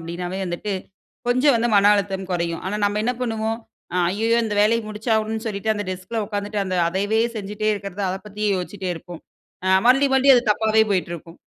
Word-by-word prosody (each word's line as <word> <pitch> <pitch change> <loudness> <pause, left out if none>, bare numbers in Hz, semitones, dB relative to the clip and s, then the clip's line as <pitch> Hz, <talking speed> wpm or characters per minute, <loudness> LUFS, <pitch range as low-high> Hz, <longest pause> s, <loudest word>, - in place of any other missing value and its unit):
அப்படின்னாவே 175 +3 -5
வந்துட்டு, 180 +3 -3 0.6
கொஞ்சம் 255 +3 +4
வந்து 235 +1 +1
மன 200 +1 +6
அழுத்தம் 195 -2 -2
குறையும். 170 -2 -1
ஆனா, 205 - -2
நம்ம 205 +1 +1
என்ன 245 - +1
பண்ணுவோம்? 225 -2 -1 0.4
அ - - +1
ஐயயோ! 225 +4 +1
இந்த 215 -2 -2
வேலைய 230 +2 +3
முடிச்சாகனும்னு 220 0 -1
சொல்லிட்டு 215 +1 -1
அந்த 205 0 -3
டெஸ்க் 185 +4 -7
ல 225 - +1
உக்காந்துட்டு 205 0 -3
அந்த 185 -1 -3
அதையவே 205 +5 0 0.2
செஞ்சிட்டே 210 +1 -3
இருக்கிறதா 200 0 -5
அதப் 190 +1 -6
பத்தியே 210 0 -2
யோசிட்டே 185 +1 -5
இருப்போம். 175 0 -10 0.4
அ - - +1 0.2
மறுபடி 270 +3 +5
மறுபடி 265 +1 +5
அது 245 - +4
தப்பாவே 220 +1 +3
போய்ட்டு 185 -3 0
இருக்கும். 165 +1 -11
205 Hz, 190 wpm, -22 LUFS, 190-220 Hz, 0.6 s, மன